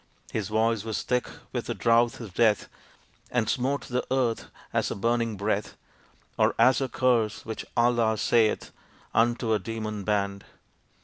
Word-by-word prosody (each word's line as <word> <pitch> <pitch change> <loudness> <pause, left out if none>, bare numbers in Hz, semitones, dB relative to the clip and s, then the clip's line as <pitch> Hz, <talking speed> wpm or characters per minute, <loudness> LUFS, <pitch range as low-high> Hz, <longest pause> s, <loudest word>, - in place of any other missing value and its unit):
His 105 -4 -2
voice 110 0 +1
was 110 -1 -3
thick 125 0 0 0.2
with 120 -2 -3
the 120 - -2
drouth 115 +3 +3
of 110 -6 -8
death 110 -1 +3 0.6
And 120 -3 0
smote 135 +4 0
the 125 0 -2
earth 125 -4 0 0.2
as - - +1
a - - -3
burning 115 +1 0
breath, 105 +1 -2 0.6
Or - - +3
as 125 +4 +5
a 135 - -1
curse 115 -4 +1
which 110 -1 -5
Allah 120 -2 +3
saith 110 0 +2 0.4
Unto 120 0 +2
a 110 - +2
demon 110 0 -4
band. 100 -1 -1
115 Hz, 150 wpm, -27 LUFS, 110-120 Hz, 0.6 s, as